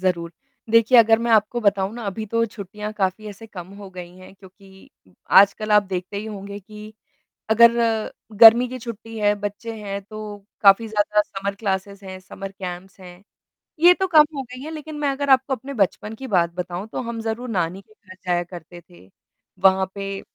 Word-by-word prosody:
ज़रूर। 175 -2 -1 0.4
देखिए 230 +2 +5
अगर 225 0 +6
मैं 235 0 -2
आपको 220 +2 +2
बताऊँ 200 -2 +1
ना 240 - -7
अभी 215 +3 -4
तो 230 +2 0
छुट्टियाँ 210 0 -8
काफ़ी 205 +1 -2
ऐसे 210 +2 -11
कम 180 -5 -10
हो 200 -1 -10
गई 180 -1 -9
हैं 185 +1 -14
क्योंकि 190 0 -18 0.5
आजकल 200 +2 +1
आप 210 0 +6
देखते 185 0 -5
ही 205 - -4
होंगे 200 -1 -7
कि 210 +2 -12 0.6
अगर 235 +1 +7 0.7
गर्मी 235 +2 +9
की 255 +1 -7
छुट्टी 225 -1 -8
है, 205 -1 +2
बच्चे 205 +3 -6
हैं 200 -1 -4
तो 210 0 -9 0.2
काफ़ी 205 +3 +5
ज़्यादा 210 0 +1
समर 200 0 -5
क्लासेस 200 -1 -3
हैं, 190 -1 -8
समर 195 +1 -9
कैंप्स 190 0 -8
हैं। 180 0 -13 0.6
ये 350 +2 +7
तो 380 +1 -2
कम 310 -4 +6
हो 275 - -3
गई 250 +1 -11
है 310 - -7
लेक़िन 310 -1 -8
मैं 290 -1 0
अगर 280 +1 -3
आपको 265 0 +3
अपने 265 +4 -9
बचपन 210 0 -1
की 265 +3 -8
बात 175 -6 +1
बताऊँ 180 +2 -5
तो 225 - -5
हम 235 -2 -5
ज़रूर 225 +3 -4
नानी 185 -2 -2
के 215 - -25 0.2
घर 185 - -11
जाया 175 -1 +1
करते 175 0 -12
थे। 175 - -18 0.6
वहाँ 190 0 +5
पे 195 0 -5
205 Hz, 190 wpm, -22 LUFS, 190-230 Hz, 0.7 s, गर्मी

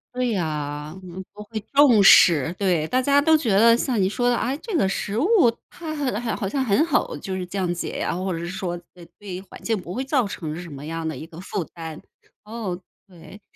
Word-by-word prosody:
对 250 -1 0
呀， 150 -4 -3
嗯， 185 +1 -8
不 210 - -10
会 220 +1 -5
重 270 -7 +6
视。 165 -4 +7
对， 175 -6 +1
大 255 +1 +1
家 280 +2 +4
都 320 +2 +5
觉 280 -7 0
得 230 +4 +6
像 240 -3 0
你 190 - +3
说 245 +4 0
的， 240 - +2
哎， 260 +3 -1
这 440 -6 -4
个 195 - +3
食 200 +2 -2
物 305 +10 +2 0.4
它 315 -2 -6
好 290 -2 -2 0.2
好 230 -2 -2
好 195 - -3
像 265 +6 -1
很 250 +8 +3
好 - - 0
就 190 -1 -5
是 185 - -3
降 180 -2 -1
解 175 - -4
啊。 - - -1
或 185 +1 -2
者 165 - -2
是 170 +1 -5
说， 180 -1 -4 0.2
对 175 - -14
对 200 -3 -8
于 185 - -5
环 195 - -13
境 225 - +1
不 180 -3 -7
会 260 - -1
造 265 -6 +1
成 160 -5 -5
什 170 - -9
么 140 0 -9
样 165 0 -4
的 155 -5 -4
一 155 - -7
个 165 0 -12
负 190 -1 -3
担， 160 -2 -8 0.4
哦， 210 -5 -5 0.3
对。 190 +3 -14
195 Hz, 250 characters per minute, -23 LUFS, 170-245 Hz, 0.4 s, 视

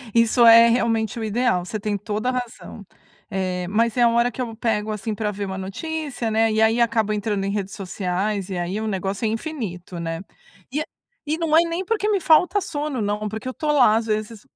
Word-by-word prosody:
Isso 230 +1 +5
é 230 0 +9
realmente 230 -2 +1
o - - -3
ideal, 220 -4 +1
você 215 +3 -4
tem 205 0 -2
toda 210 +4 -2
a - - +2
razão. 245 -4 -6 0.4
Eh, 185 -2 -2
mas 225 +2 +1
é 245 - +1
a 235 - +6
hora 235 +1 +2
que 255 - -6
eu 230 -3 -4
pego 220 -2 -1
assim 215 +1 -3
pra 210 0 -2
ver 200 0 -4
uma 190 -1 -5
notícia, 270 +6 -4
né, 220 +1 +2
e 215 0 +1
aí 225 +2 +3
acabo 220 -2 +1
entrando 205 -1 -1
em 195 - -1
redes 200 -1 -3
sociais, 195 +1 -2
e 185 - -3
aí 175 +4 -2
o 220 - -3
negócio 195 +1 -3
é - - +3
infinito, 215 - -5
né. 165 0 -4 0.5
E 295 +3 -1
é - - -3 0.4
e 305 +2 -1
não 325 -2 +1
é 325 - +8
nem 340 +2 -2
porque 425 +1 0
me 410 -2 +2
falta 355 +4 +4
sono 295 - -3
não, 210 +1 -2
porque 220 +4 -6
eu 255 - -3
tô 300 +2 -1
lá, 250 -7 +5
às 225 0 -1
vezes, 215 0 -2
220 Hz, 225 wpm, -22 LUFS, 200-250 Hz, 0.5 s, é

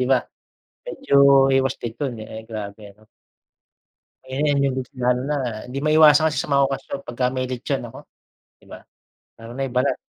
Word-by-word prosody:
'di 125 - +1
ba? 130 -2 +4 0.7
Medyo 140 - -1 0.4
iwas 135 0 -1
din 115 -2 -6
dun. 135 -4 -3
Eh, 110 0 -8
grabe 105 -2 -7
ano. 105 +2 -23 1.2
Ayan, 140 +2 0
yun 135 - 0 0.2
lalo 125 0 +1
na 150 - 0 0.4
di 135 - -3
maiwasan 155 0 +6
kasi 155 - -1
sa - - -8
mga 140 0 +4
okasyon 135 0 -5
pagka 125 +1 -1
may 130 -1 -2
lechon, 125 -1 -3
naku, - - -10 0.6
'di - - -24
ba? - - -10 0.6
Lalo 115 +1 -11
na 135 - -3
yung 125 - -11
balat. 130 +3 +1
130 Hz, 170 wpm, -22 LUFS, 120-140 Hz, 1.2 s, maiwasan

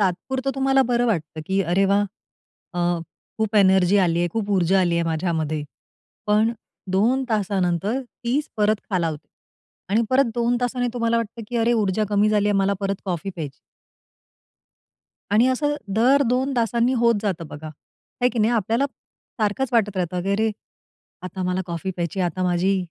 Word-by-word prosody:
तात्पुरतं 255 +9 -1
तुम्हाला 270 0 +3
बरं 245 0 +2
वाटतं, 160 -7 -2
की 195 +1 +1
अरे 185 +2 +2
वाह! 200 +1 +3 0.7
अ, 175 - -3 0.6
खूप 220 0 0
एनर्जी 190 -1 +5
आली 170 -1 +1
आहे, 175 0 +1
खूप 215 -2 -2
ऊर्जा 190 0 +3
आली 175 -2 +1
आहे 170 - +1
माझ्यामध्ये. 160 -2 -1 0.6
पण 215 +2 +3 0.4
2 240 +8 +2
तासानंतर 200 +1 0
तीच 250 +4 -3
परत 215 0 +3
खालावते. 165 -6 -2 0.6
आणि 220 +3 +3
परत 265 +2 +4
2 240 0 +1
तासाने 245 0 0
तुम्हाला 230 -1 +1
वाटतं 230 0 -3
की 245 - -3
अरे, 230 +1 +2
ऊर्जा 215 -2 +1
कमी 205 +1 +3
झाली 210 -1 +2
आहे. 205 - +2
मला 195 +1 +2
परत 195 0 0
कॉफी 185 0 -3
प्यायची. 150 -5 -5 1.8
आणि 220 +4 +4
असं 290 +3 +1 0.2
दर 260 +6 +4
2 260 +3 +1
तासांनी 235 +1 +2
होत 235 0 +4
जातं 180 -6 -2
बघा, 150 +2 -9
आहे 155 - -4
की 245 - -4
नाही. 220 +2 +3
आपल्याला 230 +3 +1 0.6
सारखंच 215 +5 0
वाटत 210 -4 +2
राहतं 180 0 -1
की 195 - -2
"अरे, 220 +2 +1 0.7
आता 185 +1 -5
मला 180 +1 0
कॉफी 170 +2 -4
प्यायची 175 +1 -3
आहे 180 - +2
आता 185 +3 -4
माझी 180 +2 +2
205 Hz, 165 wpm, -23 LUFS, 180-235 Hz, 1.8 s, एनर्जी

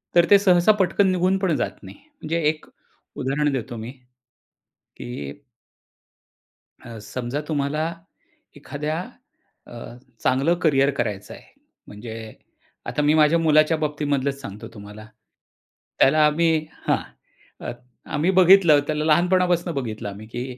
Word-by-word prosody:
तर 170 - +6
ते 200 - +8
सहसा 180 0 +4
पटकन 190 +2 +2
निघून 185 +1 +1
पण 180 -5 +1
जात - - -4
नाही, - - -11
म्हणजे 275 - -5
एक 155 -1 -5 0.5
उदाहरण 145 +3 -1
देतो 120 -2 -4
मी. 115 +2 -7 1.1
की 70 +3 -8 1.4
अ, 115 -1 -10 0.2
समजा 130 +3 -3
तुम्हाला 155 +2 -1 0.6
एखाद्या 150 +3 -4 0.7
अ, - - -15 0.5
चांगलं 140 +7 +2
करियर 140 -3 +3
करायचं 105 -7 -4
आहे. - - -13 0.4
म्हणजे, 110 +2 -9 0.7
आता 150 - -2
मी 150 +1 +3
माझ्या 155 +2 +4
मुलाच्या 155 0 +3
बाबतीमधलच 145 -2 -2
सांगतो 105 -5 -8
तुम्हाला. 105 +1 -11 0.9
त्याला 155 +3 +5
आम्ही 160 +1 +2 0.2
हां, - - +3 1.2
आम्ही 165 +6 +1
बघितलं 180 -5 +6
त्याला 155 0 -1
लहानपणापासून 175 +1 +2
बघितलं 110 -6 -4
आम्ही 105 +2 -10
की 120 +2 -5
150 Hz, 120 wpm, -23 LUFS, 130-170 Hz, 1.4 s, ते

